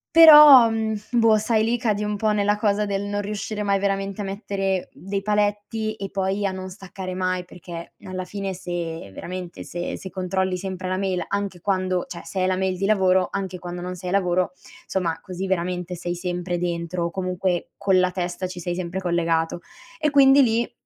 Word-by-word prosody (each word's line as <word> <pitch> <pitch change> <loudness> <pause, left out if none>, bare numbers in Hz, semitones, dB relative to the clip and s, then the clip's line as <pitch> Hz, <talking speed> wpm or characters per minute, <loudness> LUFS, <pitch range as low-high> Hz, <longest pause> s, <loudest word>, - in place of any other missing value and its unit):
Però, 300 -7 +10
mhmm, 220 -1 -1
boh, 225 -2 +4
sai 215 0 +1
lì 230 +2 +1
cadi 210 -3 0
un 210 0 -1
po' 215 +1 +1
nella 205 0 +2
cosa 210 0 +1
del 200 0 -2
non 205 0 -2
riuscire 210 +1 -4
mai 200 -1 +2
veramente 195 0 -2
a - - -3
mettere 195 -1 -2
dei 195 +1 -4
paletti, 210 +1 0
e 195 -2 -6
poi 195 +1 -1
a 195 - +1
non 185 0 -6
staccare 185 -1 -7
mai 185 0 -1
perché 170 -1 -9
alla 185 0 -5
fine 195 0 -4
se 170 - -5
veramente 180 - -7
se 175 0 -5
se 190 - -8
controlli 185 0 -1
sempre 185 0 -5
la 185 0 -1
mail, 185 -3 -1
anche 200 -2 -3
quando 185 -1 0
cioè 170 - -7
se 165 +3 -5
hai 185 - +2
la 185 - +1
mail 190 -1 -1
di 195 - -1
lavoro 190 -3 +3
anche 190 -2 -4
quando 175 0 -6
non 180 0 -5
sei 180 0 -6
a - - -2
lavoro, 180 -2 +1 0.3
insomma 170 -4 -1
così 185 +1 -5
veramente 180 -1 -2
sei 175 0 -4
sempre 175 0 -3
dentro 170 0 -2
o 170 - -3
comunque 185 -1 -2
con 195 -2 +3
la 180 - +3
testa 180 0 -3
ci 180 0 -8
sei 175 0 -3
sempre 180 +1 -3
collegato 170 -2 0 0.4
e 305 - +2
quindi 280 -1 +6
lì 230 -1 +1
190 Hz, 200 wpm, -23 LUFS, 180-205 Hz, 0.4 s, Però